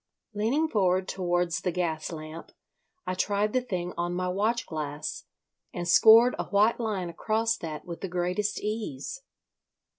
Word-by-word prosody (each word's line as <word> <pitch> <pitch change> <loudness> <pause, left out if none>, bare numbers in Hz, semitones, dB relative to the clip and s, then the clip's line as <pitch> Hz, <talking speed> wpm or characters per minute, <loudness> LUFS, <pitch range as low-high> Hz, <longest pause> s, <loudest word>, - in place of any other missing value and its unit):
Leaning 235 +10 +1
forward 185 -6 +1
towards 175 -2 0
the 180 - 0
gas 165 -3 -2
lamp, 155 0 -8 0.5
I 185 - -1
tried 205 +3 0
the 255 - +2
thing 180 -7 -4
on 175 +1 -1
my 180 0 -1
watch 215 +6 0
glass, 150 -2 -5 0.5
and 175 0 -3
scored 225 +6 +7
a - - -1
white 210 +4 +3
line 200 -7 -2
across 225 +6 0
that 155 -5 -6
with 170 -2 -7
the 195 - -3
greatest 180 +3 -1
ease. 210 - -4
185 Hz, 150 wpm, -28 LUFS, 175-215 Hz, 0.5 s, scored